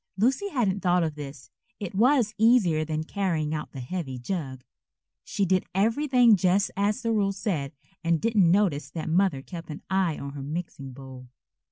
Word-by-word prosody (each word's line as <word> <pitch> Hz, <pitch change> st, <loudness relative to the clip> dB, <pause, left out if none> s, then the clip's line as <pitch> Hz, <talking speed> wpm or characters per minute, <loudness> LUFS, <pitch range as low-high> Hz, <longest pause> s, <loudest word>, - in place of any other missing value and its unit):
Lucy 265 Hz, -, +1 dB
hadn't 215 Hz, -, 0 dB
thought 180 Hz, -2 st, +2 dB
of 160 Hz, -2 st, -1 dB
this. 145 Hz, -2 st, -9 dB, 0.3 s
It 200 Hz, -5 st, -5 dB
was 235 Hz, +1 st, +3 dB
easier 215 Hz, -9 st, +4 dB
than 155 Hz, 0 st, -2 dB
carrying 165 Hz, -4 st, -1 dB
out 155 Hz, -, -4 dB
the 135 Hz, -, -7 dB
heavy 135 Hz, -1 st, -4 dB
jug. 130 Hz, -2 st, -5 dB, 0.6 s
She 200 Hz, -, -1 dB
did 185 Hz, 0 st, +1 dB
everything 240 Hz, +2 st, +4 dB
just 185 Hz, +2 st, +2 dB
as 205 Hz, +3 st, 0 dB
the 230 Hz, -, 0 dB
rule 200 Hz, -3 st, +1 dB
said 175 Hz, -8 st, -3 dB, 0.3 s
and 165 Hz, -1 st, +2 dB
didn't 210 Hz, -5 st, +3 dB
notice 170 Hz, -7 st, +2 dB
that 160 Hz, +2 st, -5 dB
Mother 170 Hz, -5 st, +2 dB
kept 170 Hz, -1 st, -9 dB
an 150 Hz, -, -7 dB
eye 190 Hz, -5 st, +1 dB
on 140 Hz, -, -6 dB
her 140 Hz, 0 st, -7 dB
mixing 145 Hz, -2 st, -5 dB
bowl. 130 Hz, -1 st, -11 dB
180 Hz, 175 wpm, -26 LUFS, 150-205 Hz, 0.6 s, easier